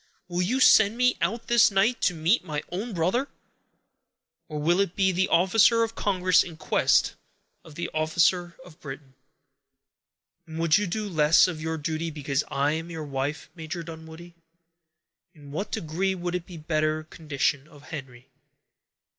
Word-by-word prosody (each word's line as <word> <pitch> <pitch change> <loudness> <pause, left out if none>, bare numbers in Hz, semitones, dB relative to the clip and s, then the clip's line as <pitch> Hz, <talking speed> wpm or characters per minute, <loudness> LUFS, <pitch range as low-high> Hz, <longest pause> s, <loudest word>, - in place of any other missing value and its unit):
Will 175 0 -2
you 235 +9 0
send 220 -3 +5
me 250 0 +3
out 225 +7 -1
this 235 -1 +5
night, 200 +5 +1
to 180 - +1
meet 165 +9 +2
my 150 -1 -4
own 205 +7 -4
brother? 190 +10 0 1.2
or 155 - -5
will 170 +5 +1
it 200 -2 0
be 190 -1 +2
the 190 +1 +1
officer 205 +6 +4
of 225 0 -3
Congress 185 -5 +2
in 165 -3 -7
quest - - +2 0.5
of 160 - -14
the 170 - -3
officer 170 +3 +1
of 175 -1 -16
Britain?" 135 -1 -10 1.3
"And 160 0 -8
would 165 -1 +3
you 205 - -2
do 210 +4 -3
less 155 -3 +4
of 165 -4 -5
your 160 0 -3
duty 160 +1 -3
because 145 -2 -2
I 140 +1 0
am 165 +2 -4
your 160 -2 -6
wife, 140 +2 -4
Major 165 0 -6
Dunwoodie? 160 +1 -11 1.0
In 145 -2 -14
what 180 +8 -4
degree 185 +5 -2
would 175 -1 -4
it 180 -1 -4 0.2
better 155 -1 0
the - - -15
condition 145 -2 -1
of 145 -3 -17
Henry?" 130 -5 -9
165 Hz, 165 wpm, -26 LUFS, 155-190 Hz, 1.3 s, send